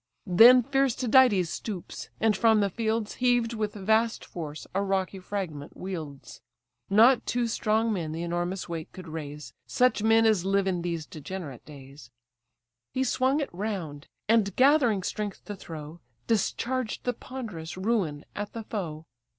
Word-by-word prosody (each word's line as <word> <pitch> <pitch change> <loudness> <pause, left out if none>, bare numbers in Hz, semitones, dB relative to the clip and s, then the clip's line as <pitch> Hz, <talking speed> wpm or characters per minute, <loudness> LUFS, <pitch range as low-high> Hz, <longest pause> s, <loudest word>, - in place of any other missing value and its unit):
Then 235 +7 +8
fierce 270 -1 +1
Tydides 245 - +4
stoops; 200 -6 -6
and 220 -2 +3
from 220 +1 +4
the 200 -2 +1
fields 220 0 -1
Heaved 245 -2 +2
with 215 -2 -3
vast 220 +3 +1
force, 155 -3 -7
a 195 - +1
rocky 195 -1 -1
fragment 180 -7 -5
wields. 160 -7 -7 0.5
Not 230 +6 +6
two 240 0 0
strong 220 0 +1
men 165 -6 -3
the 165 +2 -4
enormous 175 +2 -2
weight 165 -2 -6
could 185 -2 -10
raise, 150 -2 -7
Such 250 -3 +2
men 225 +1 +4
as 215 -5 +3
live 195 0 +1
in 180 -2 -1
these 170 -2 -3
degenerate 155 -4 -8
days: 140 -3 -13 0.9
He 260 - +2
swung 265 +3 +1
it 280 - -4
round; 175 -7 -4 0.2
and, 215 -3 +3
gathering 255 -7 +4
strength 205 +1 -4
to 205 - -6
throw, 160 -3 -9 0.3
Discharged 235 +2 -1
the 245 - 0
ponderous 215 -11 -7
ruin 185 -8 -1
at 205 0 -5
the 230 - -5
foe. 165 -8 -5
200 Hz, 150 wpm, -27 LUFS, 170-230 Hz, 0.9 s, Then